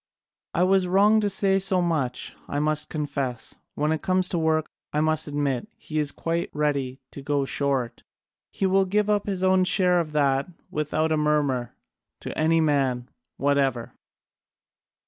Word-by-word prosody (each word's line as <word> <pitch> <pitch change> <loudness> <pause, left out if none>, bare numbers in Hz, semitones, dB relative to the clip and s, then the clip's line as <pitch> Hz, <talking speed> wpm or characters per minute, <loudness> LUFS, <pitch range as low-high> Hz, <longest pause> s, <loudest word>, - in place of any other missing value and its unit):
I 175 - +3
was 190 0 +3
wrong 205 +4 +4
to 205 -1 +1
say 195 0 +2
so 190 -1 +2
much, 155 -8 -2
I 145 - -3
must 150 0 0
confess. 140 -5 -4 0.2
When 150 +1 0
it 160 - -1
comes 185 0 +1
to 175 - 0
work, 160 -1 +1 0.3
I 150 - 0
must 155 0 +1
admit, 145 -4 -1
he 155 0 -4
is 145 -1 +1
quite 170 +1 -2
ready 140 -3 -1
to 140 - -9
go 140 0 0
short: 135 -4 -1 0.5
he 195 - -2
will 190 0 +3
give 210 +2 +1
up 205 -1 0
his 190 -2 -2
own 185 0 +4
share 180 -1 +4
of 160 -3 -3
that, 140 -2 +2 0.2
without 155 +1 -1
a 155 - +2
murmur, 145 -5 0 0.5
to - - -6
any 165 +1 +2
man 135 -5 +1 0.3
whatever." 135 -4 0
155 Hz, 165 wpm, -25 LUFS, 140-185 Hz, 0.5 s, wrong